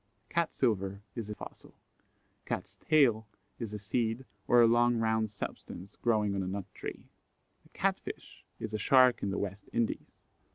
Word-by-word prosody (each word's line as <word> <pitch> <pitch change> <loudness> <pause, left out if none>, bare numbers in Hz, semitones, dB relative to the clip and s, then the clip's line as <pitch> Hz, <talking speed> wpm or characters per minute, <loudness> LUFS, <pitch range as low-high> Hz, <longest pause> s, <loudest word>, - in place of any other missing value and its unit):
Cat 170 -1 +1
silver 100 -5 0
is 115 -4 -5
a 105 - -4
fossil. - - -11 0.7
Cat's - - -4
tail 120 -8 +4 0.3
is 115 -3 -4
a 105 - -4
seed 115 +5 -1 0.2
or 120 - +6
a 120 - +8
long 120 +1 +4
round 110 -1 +1
substance 100 -2 -7
growing 105 -4 +1
on 100 - -1
a 95 - -2
nut 95 0 -3
tree. - - -7 0.6
A - - -32
Cat - - 0
fish - - -9 0.2
is 110 -1 -5
a 110 - -1
shark 130 +2 +5
in 100 - -1
the 95 - -2
West 100 0 -4
Indies. 115 -1 -1
110 Hz, 170 wpm, -31 LUFS, 100-120 Hz, 0.7 s, a